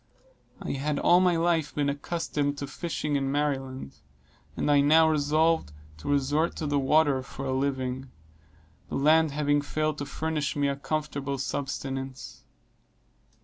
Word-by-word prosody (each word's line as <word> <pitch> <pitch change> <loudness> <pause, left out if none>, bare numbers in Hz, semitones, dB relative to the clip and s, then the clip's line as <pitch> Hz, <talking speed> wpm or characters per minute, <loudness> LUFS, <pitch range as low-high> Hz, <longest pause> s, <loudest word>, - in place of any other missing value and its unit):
I - - -4
had 145 +2 -1
all 175 +4 +5
my 180 -1 +3
life 165 -2 +1
been 145 -1 +1
accustomed 145 0 -2
to 140 - -4
fishing 150 +1 -3
in 135 -1 -1
Maryland, 135 - -2 0.6
and 150 - +1
I 145 -1 +5
now 160 +3 +6
resolved 155 - +2 0.3
to 80 - -6
resort 145 +4 +1
to 160 - -4
the 145 -1 +1
water 145 -1 +3
for 135 +1 -8
a 130 - -1
living; 130 -1 -2 0.8
the - - -4
land 155 +3 +4
having 145 0 +1
failed 155 +1 -2
to 145 - -4
furnish 155 -2 -2
me 145 -1 +1
a 140 - -1
comfortable 140 -1 -3
subsistence. 135 -2 -5
145 Hz, 145 wpm, -27 LUFS, 135-155 Hz, 0.8 s, now